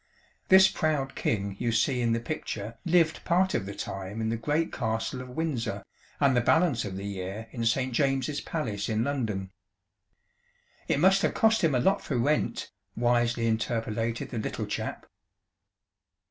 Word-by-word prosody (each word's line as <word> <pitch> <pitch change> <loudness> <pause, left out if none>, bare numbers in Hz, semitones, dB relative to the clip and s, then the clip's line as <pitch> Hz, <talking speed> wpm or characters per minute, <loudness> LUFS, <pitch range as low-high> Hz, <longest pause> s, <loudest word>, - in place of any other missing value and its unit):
This 190 +1 +8
proud 150 -6 -1
king 100 -2 -1
you 120 -1 0
see 125 +2 +1
in 115 -1 +1
the 115 - +1
picture 115 -4 -5
lived 170 -2 +3
part 185 +2 +2
of 95 - -1
the 100 - -6
time 95 +2 -5
in 110 0 -1
the 115 - 0
great 150 +8 -1
castle 115 +3 -2
of 130 - -9
Windsor, 125 -8 -2 0.4
and 140 -2 +4
the 120 - +4
balance 160 -2 +3
of 95 - -5
the 100 - -5
year 100 +2 -5
in 115 -2 -1
Saint 130 +2 +1
James's 135 +2 0
Palace 110 -11 -3
in 110 0 +1
London." 110 -9 -2 1.4
"It - - +1
must 190 +4 +5
have - - 0
cost 220 -2 +3
him 155 -5 +3
a - - +3
lot 190 +10 +2
for 135 - -2
rent," 145 +6 0 0.2
wisely 120 0 +2
interpolated 115 0 -1
the 115 - -3
Little - - -3
Chap. - - -4
120 Hz, 165 wpm, -28 LUFS, 110-150 Hz, 1.4 s, This